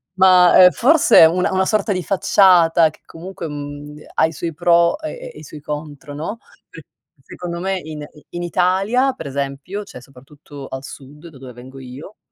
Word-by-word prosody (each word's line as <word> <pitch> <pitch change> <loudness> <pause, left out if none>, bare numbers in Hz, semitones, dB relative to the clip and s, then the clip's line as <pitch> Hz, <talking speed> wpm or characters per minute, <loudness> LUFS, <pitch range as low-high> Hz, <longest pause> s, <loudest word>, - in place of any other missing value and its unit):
ma 185 -1 +5
ma, 185 - +7
uhm, - - +8
forse 275 - +5
una 180 +3 +1
una 190 0 0
sorta 215 0 0
di 185 -1 -4
facciata 175 -4 +3
che 155 - -20
comunque, 170 +1 -9
mhmm, 145 0 -8
de 150 - -15
ha - - +2
i 160 - -3
suoi 165 +2 -5
pro 170 - +2
e - - -8
e - - -13
i - - -12
suoi 150 - -12
contro, 150 -1 -8
no, 160 +10 -6 0.3
se - - -12 0.4
secondo 170 -1 -7
me 190 +1 -2
in 155 -3 -9
i 150 - -20
in 175 0 -6
Italia, 195 +9 0
per 245 - -9
esempio, 140 +8 -5
cioè 125 - -13
soprattutto 135 +2 -14
al 135 0 -8
sud 145 +4 -12
da 150 - -16
dove 130 -1 -11
vengo 130 +3 -13
io, 135 +10 -12
165 Hz, 195 wpm, -18 LUFS, 145-185 Hz, 0.4 s, uhm